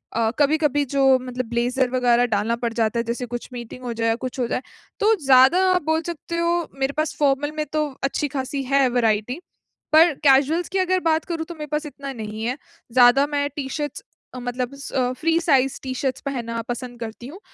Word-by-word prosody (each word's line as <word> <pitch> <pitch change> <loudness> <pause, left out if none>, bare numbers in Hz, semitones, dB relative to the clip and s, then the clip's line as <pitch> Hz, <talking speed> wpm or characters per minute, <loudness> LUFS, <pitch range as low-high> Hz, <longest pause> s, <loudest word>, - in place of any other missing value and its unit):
अ, 225 -1 +2
कभी-कभी 295 -1 +2
जो 280 -1 +1 0.2
मतलब 250 0 -4
ब्लेज़र 245 +2 0
वगैरह 245 -1 +3
डालना 220 0 0
पड़ 235 0 -3
जाता 230 0 0
है - - 0
जैसे 240 +2 -3
कुछ 240 0 -6
मीटिंग 245 +1 -8
हो 245 - -3
जाए 230 0 -1
या 225 - +2
कुछ 255 +2 -6
हो 245 - +1
जाए। 250 - -2 0.4
तो 430 +2 +4
ज़्यादा 265 +6 +6
आप 365 -1 +2
बोल 320 +1 +1
सकते 335 0 -5
हो, 340 0 0
मेरे 270 +1 0
पास 310 0 -1
फॉर्मल 290 0 +2
में 305 - -1
तो 305 0 +1 0.2
अच्छी 275 +2 0
खासी 270 +1 -3
है 275 -1 +4
वेराइटी, 235 +2 0 0.5
पर 325 +1 +7
कैजुअल्स 290 +5 +4
की 385 - -1
अगर 370 0 +2
बात 320 0 +1
करूँ 330 -2 -3
तो 340 0 -9
मेरे 300 -1 -7
पास 300 +1 -1
इतना 280 -2 -7
नहीं 220 -2 -6
है। 250 +3 -2 0.4
ज़्यादा 255 +3 +6
मैं 285 -1 -1
टी 275 -3 -4
शर्ट्स 295 +1 -4 0.3
अ, - - -5
मतलब 245 +1 -3
स 255 -2 -2
फ्री 330 +1 +2
साइज़ 270 -6 +2
टी-शर्ट्स 260 0 -3
पहनना 235 -4 -3
पसंद 245 0 -5
करती 230 +1 -7
हूँ। 330 +8 -10
265 Hz, 205 wpm, -22 LUFS, 245-300 Hz, 0.5 s, पर